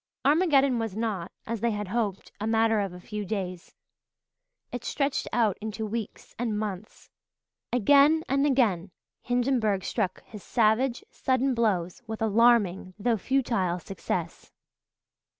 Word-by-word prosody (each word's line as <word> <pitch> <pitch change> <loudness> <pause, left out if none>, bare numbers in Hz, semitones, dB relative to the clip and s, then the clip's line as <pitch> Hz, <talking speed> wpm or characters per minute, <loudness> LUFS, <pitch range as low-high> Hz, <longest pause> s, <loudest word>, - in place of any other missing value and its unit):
Armageddon 280 -5 +4
was 225 -4 -3
not, 205 -6 -2
as 230 -2 -4
they 235 - +2
had 210 -3 -3
hoped, 205 -3 -2
a 215 - -2
matter 225 -1 +3
of 200 -2 -1
a 180 - -10
few 210 +3 -5
days. 185 -3 -5 1.0
It 245 - -5
stretched 280 -1 -1
out 220 -5 +1
into 220 +1 -4
weeks 220 0 -6
and 230 -3 -1
months. 210 -1 -6 0.6
Again 285 +6 +5
and 275 +2 +2
again 210 -10 +2 0.3
Hindenburg 240 -6 +1
struck 190 -4 -2
his 210 - -11
savage, 235 +4 +1
sudden 260 +1 +1
blows, 195 -7 0
with 220 0 -4
alarming, 210 -5 +3
though 230 +2 +1
futile 220 -7 0
success. 175 -1 -5
220 Hz, 135 wpm, -27 LUFS, 195-245 Hz, 1.0 s, Again